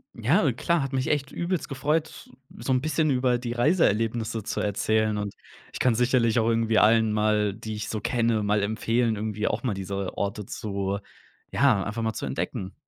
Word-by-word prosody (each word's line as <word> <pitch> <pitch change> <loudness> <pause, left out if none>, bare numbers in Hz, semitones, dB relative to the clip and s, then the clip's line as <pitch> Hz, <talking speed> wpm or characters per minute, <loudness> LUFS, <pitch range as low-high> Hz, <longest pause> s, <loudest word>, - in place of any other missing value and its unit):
Ja, 135 - +2
klar, 170 +7 +1
hat 135 -1 -3
mich 130 -1 -1
echt 140 -2 0
übelst 175 0 -2
gefreut, 150 +3 -2 0.3
so 130 - -1
'n 125 - +2
bisschen 155 0 +1
über 125 -1 +2
die 120 -1 -4
Reiseerlebnisse 115 - +1
zu - - -3
erzählen. 110 +1 +1
Und 105 -1 -4 0.4
ich - - -7
kann 125 - +3
sicherlich 120 -1 +2
auch 115 - +1
irgendwie 115 -1 +2
allen 110 -1 +4
mal, 105 -1 +2
die 110 +1 -6
ich 105 - -5
so 110 - -3
kenne 115 -1 +1
mal 105 0 +1
empfehlen, 115 +2 0
irgendwie 105 0 -2
auch - - -1
mal 120 -6 -1
diese 95 0 -4
Orte 100 0 -3
zu, 100 -1 -3 0.5
ja, 125 -9 +3
einfach 105 +3 -4
mal 110 0 -1
zu - - -4
entdecken. 95 0 -4
115 Hz, 185 wpm, -26 LUFS, 105-130 Hz, 0.5 s, allen